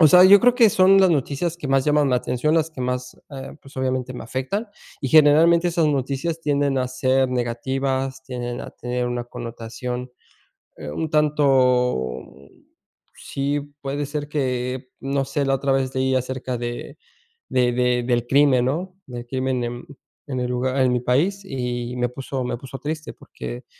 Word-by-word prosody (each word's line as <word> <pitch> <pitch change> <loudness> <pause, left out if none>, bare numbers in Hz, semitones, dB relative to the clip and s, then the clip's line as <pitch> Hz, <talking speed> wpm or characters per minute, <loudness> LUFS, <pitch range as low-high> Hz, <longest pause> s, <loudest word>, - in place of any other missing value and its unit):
O 155 - +8
sea, 180 +2 +8
yo 200 +1 +8
creo 245 0 +5
que 235 -3 +6
son 190 +1 +5
las 190 - +6
noticias, 155 +3 -1
que 145 -5 -6
más 135 -1 +3
llaman 150 -1 +3
mi 125 - +2
atención, 125 +5 0
las 160 -1 +2
que 135 - -9
más, 125 0 -3 0.2
eh, 135 +2 -8
pues, 135 - -15
obviamente 130 -1 -1
me 125 - -7
afectan. 135 - -3 0.3
Y 135 - -2
generalmente, 160 +4 +5
son 165 -3 +2
noticias 140 +5 -2
tienden 145 -2 +1
a 130 -1 +1
ser 130 0 +1
negativas, 130 +2 -2
tienden 125 -2 -5
a - - -8
tener 125 0 -3
una 120 0 -3
connotación, 120 +1 -6 0.7
eh, 75 -1 -7
un 160 - -3
tanto, 130 - +2 0.9
sí, 140 +1 -2 0.2
puede 140 +1 -3
ser 145 0 -4
que 130 -3 -2
no 135 0 -1
sé, 145 +1 -1
la 135 - +2
otra 135 +1 0
vez 135 -1 0
leí 130 0 +1
acerca 130 -1 -2
de 120 +5 -6 0.5
de 125 -1 +2
de 125 0 +1
del 120 -1 0
crimen, 135 -2 +4
¿no?, 180 +7 -2
del 120 -1 -7
crimen 130 -1 -1
en 120 +5 -6 0.4
en 130 -3 -3
el 125 - -1
lugar 130 +2 0
en 125 -1 +3
mi 125 - +1
país, 165 +12 +1
y 125 -5 -4
me 125 0 0
puso 130 +1 -5
me 125 - -2
puso 135 0 -8
triste, 155 +3 -5
porque, - - -8
130 Hz, 175 wpm, -22 LUFS, 125-145 Hz, 0.9 s, O